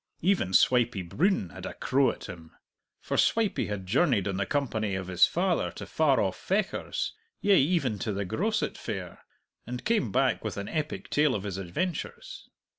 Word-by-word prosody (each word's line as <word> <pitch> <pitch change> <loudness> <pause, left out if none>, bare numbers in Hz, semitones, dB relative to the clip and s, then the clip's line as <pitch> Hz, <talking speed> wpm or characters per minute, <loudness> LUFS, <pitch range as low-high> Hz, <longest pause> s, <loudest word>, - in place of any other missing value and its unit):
Even 180 - +2
Swipey 120 -1 +3
Broon 150 - +1
had - - -8
a - - -7
crow 135 0 +2
at - - -6
him. 80 -2 -10 0.5
For - - -2
Swipey 225 -3 +2
had 105 -2 -4
journeyed 105 - +2
in 95 -2 -2
the 100 -1 -1
company 110 -8 -1
of 95 -1 -3
his 90 -1 +5
father 180 +1 0
to - - -7
far - - +2
off - - 0
Fechars, - - -1 0.3
yea 200 -1 +5
even 140 - +1
to 110 - -2
the 100 0 -2
groset 210 - -1
fair, 95 -6 -6 0.4
and 125 +1 -6
came 225 -2 +1
back 130 -2 +1
with 110 -2 -4
an 100 0 -4
epic 155 -1 -3
tale 150 -4 +3
of 100 - -3
his 95 -2 -4
adventures. 95 - -4
120 Hz, 180 wpm, -28 LUFS, 95-165 Hz, 0.5 s, his